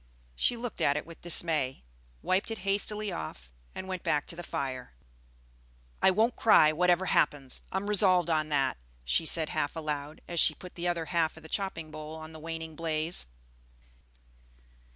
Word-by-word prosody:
She 240 - +2
looked 235 -1 -5
at 140 - +3
it - - -4
with 165 0 -13
dismay, 155 - 0 0.4
wiped 190 +4 +1
it 225 - -3
hastily 205 +1 0
off, 65 -6 -7 0.2
and 190 - -6
went 185 -2 -4
back 150 - 0
to - - -2
the 175 - -6
fire. 130 - -4 1.1
"I - - +6
won't 220 +6 +2
cry, 155 -8 +6
whatever 180 +3 +3
happens, 145 -6 +1
I'm 190 +1 -2
resolved 185 -4 +5
on 155 -2 +1
that," 135 -3 +1 0.3
she 160 - +2
said 160 -1 +3
half 145 - -1
aloud, 150 -1 -4
as 170 -1 -1
she - - +4
put 180 - -11
the 175 0 -3
other 170 -2 -1
half 165 -2 0
of - - -13
the 160 - -11
chopping 165 -6 -3
bowl 155 0 -7
on 160 0 -9
the 160 - -10
waning 160 0 -6
blaze. 160 - -1
165 Hz, 175 wpm, -30 LUFS, 150-185 Hz, 1.1 s, I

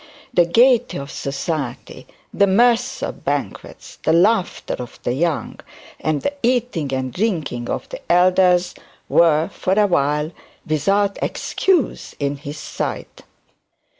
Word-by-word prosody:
The 175 -5 +4
gaiety 240 +6 +4
of 140 0 -7
society, 140 -1 -4 0.3
the 200 - +3
mirth 240 +5 +2
of - - -5
banquets, - - -4
the - - +1
laughter 190 +3 +2
of 125 -1 -8
the 120 - 0
young, 160 +2 -1 0.4
and 155 -2 -1
the 285 - -1
eating 240 - 0
and 130 -1 -2
drinking 155 - -2
of - - -3
the - - -8
elders 180 0 +4 0.3
were, 160 -1 +4
for 185 -1 -1
awhile, 155 -7 +2 0.3
without 195 +7 +1
excuse 365 -8 -1
in 140 0 -1
his 145 +1 -8
sight. - - -5
170 Hz, 125 wpm, -20 LUFS, 145-205 Hz, 0.4 s, The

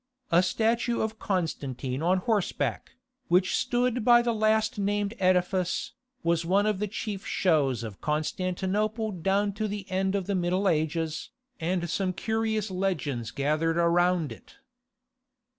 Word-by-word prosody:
A 170 +1 +6
statue 230 +5 +1
of 220 0 -2
Constantine 140 - -2
on 180 +3 +3
horseback, 205 +1 -1 0.3
which 180 +2 +3
stood 245 -1 0
by 240 +1 +6
the 235 -1 +1
last 220 +1 +1
named 205 +1 0
edifice, 185 0 +1 0.3
was 170 0 +1
one 195 +4 +2
of 210 -3 0
the 210 - -1
chief 205 -1 -5
shows 145 - +1
of 105 -4 -8
Constantinople 190 +8 -1
down 195 +3 0
to 215 +2 -2
the 205 -1 -5
end 190 +1 0
of 195 -2 -1
the 200 - -1
Middle 185 +2 +1
Ages, 160 -1 -1 0.3
and 175 +1 -1
some 185 +2 -1
curious 220 +1 -1
legends 155 - -2
gathered 155 +5 0
around 170 -2 +2
it. 115 - -13
185 Hz, 140 wpm, -27 LUFS, 165-210 Hz, 0.3 s, A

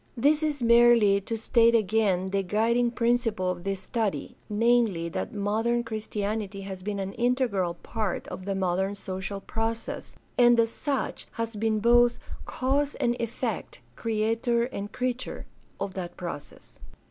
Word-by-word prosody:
This 295 +6 +3
is 295 -4 -1
merely 235 -4 +6
to 225 +3 -3
state 230 +1 +4
again 195 -3 +2
the 195 0 +1
guiding 225 +5 +2
principle 230 -5 +1
of 175 -1 -6
this 195 -1 -2
study, 215 +1 -2
namely, 215 -6 +2
that 170 - -4
modern 220 +3 0
Christianity 210 -2 -3
has 190 -1 -7
been 205 +1 -3
an 195 0 -3
integral 235 -8 +1
part 215 -5 -3
of 185 - -7
the 195 -1 -1
modern 190 +1 0
social 190 0 -5
process, 225 +2 -4 0.2
and 240 -1 +6
as 225 0 +3
such 275 +1 -3
has 230 -1 -3
been 220 +1 +1
both 240 +1 +5 0.3
cause 280 +3 0
and 240 0 +1
effect, 230 - -3 0.2
creator 230 +2 0
and 205 -4 -5
creature, 255 0 -3 0.3
of 200 -1 -3
that 180 -2 -6
process. 175 -5 -8
220 Hz, 145 wpm, -27 LUFS, 195-235 Hz, 0.3 s, merely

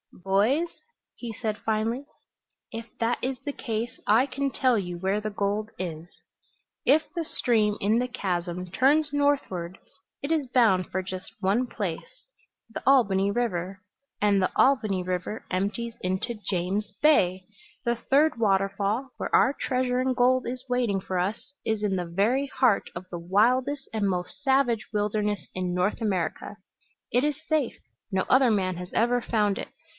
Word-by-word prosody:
"Boys," 205 - +1 0.5
he 240 -2 -6
said 215 0 -3
finally, 225 +5 -1 0.7
"if 230 -1 -7
that 230 +1 +1
is 260 +1 -1
the 290 - -1
case 230 -2 -4
I 225 +5 +5
can 280 +1 -2
tell 255 -3 +2
you 175 -3 -3
where 190 +4 0
the 215 - -2
gold 205 +1 -1
is. 165 -2 -5 0.8
If 300 +5 +5
the 335 - -1
stream 215 -8 +1
in 215 +4 +2
the 250 - 0
chasm 180 -5 -3
turns 290 +7 +3
northward 270 -12 0 0.4
it 280 - -3
is 305 -4 +1
bound 220 -8 +3
for 190 - 0
just 185 0 -7
one 205 +6 +2
place 205 - -6 0.4
the 225 - -7
Albany 200 -7 +4
River, 195 -5 -2 0.4
and 205 -2 +3
the 185 - +1
Albany 215 -9 +3
River 185 +4 -3
empties 205 +5 -2
into 190 +5 -2
James 195 +3 -1
Bay! 185 -12 +4 0.4
The 235 0 +2
third 285 +5 +2
waterfall, 200 +3 +1
where - - -4
our 270 - +5
treasure 255 -2 0
in 260 0 +1
gold 255 +1 +3
is 255 +1 -4
waiting 245 -6 +1
for 185 -1 -3
us, 205 +9 -3
is 220 -1 -1
in 200 -2 +1
the 180 -1 -2
very 215 +11 +1
heart 255 -6 +2
of 185 - -6
the 175 - -4
wildest 250 +10 +2
and 210 -3 +1
most 180 +8 -3
savage 265 -5 +2
wilderness 210 -1 -1
in 180 -1 -2
North 185 +6 0
America. 200 -1 -2 0.5
It 245 +2 +3
is 295 -1 0
safe. 310 -6 0 0.3
No 190 -1 +1
other 260 -2 +4
man 185 -4 0
has 180 0 -7
ever 240 +2 +2
found 210 -4 +1
it. - - -5
215 Hz, 160 wpm, -26 LUFS, 190-255 Hz, 0.8 s, I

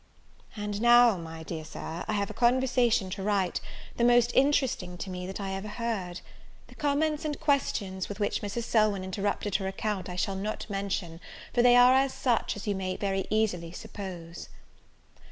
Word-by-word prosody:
And 210 0 -3
now, 240 -1 +7
my 165 -2 -8
dear 160 -1 -5
Sir, 160 +2 -6
I 215 - -1
have 200 -1 -1
a - - -8
conversation 240 -4 +2
to 195 - -4
write, 195 -2 0 0.4
the 235 - +1
most 240 0 +5
interesting 265 -10 +2
to 190 - -5
me 180 0 -5
that 190 - -6
I 195 -1 -3
ever 195 +2 -4
heard. 210 -5 -3 0.5
The - - -13
comments 300 +1 0
and 300 -2 -3
questions 200 -10 0
with 205 - -6
which 205 - 0
Mrs. 205 +3 -3
Selwyn 215 -4 +2
interrupted 200 +1 -1
her 190 -1 -4
account 195 0 -3
I 180 - -5
shall 190 +2 -1
not 205 +3 -4
mention; 195 -4 -3 0.3
for 240 - +3
they 245 0 +6
are 260 +2 +6
such 245 -3 0
as 205 - -7
you 205 - 0
may 185 -1 -3
very 195 -1 -1
easily 195 -6 0
suppose. 180 -4 -8
205 Hz, 175 wpm, -28 LUFS, 185-240 Hz, 0.5 s, now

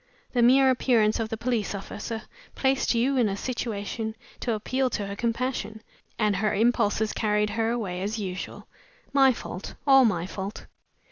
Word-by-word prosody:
The 245 - +2
mere 260 +2 +6
appearance 235 -4 +2
of 225 -1 -2
the 225 - -3
police 225 -3 -1
officer 215 +3 -5 0.3
placed 265 -2 +1
you 260 +4 +2
in 235 -4 +3
a 195 - -3
situation 220 -2 -3 0.2
to 235 - -1
appeal 255 +5 0
to 210 -4 -2
her 200 0 -5
compassion, 230 -1 -2 0.3
and 210 -3 +2
her 215 +2 +1
impulses 220 -1 +2
carried 210 -1 +1
her 225 0 0
away 200 -7 -2
as 210 +4 -2
usual. 185 -3 -5 0.5
My 270 -1 +6
fault! 195 -5 -7
All 270 -2 +7
my 180 -8 +1
fault!" 195 +2 -6
225 Hz, 160 wpm, -26 LUFS, 205-245 Hz, 0.5 s, All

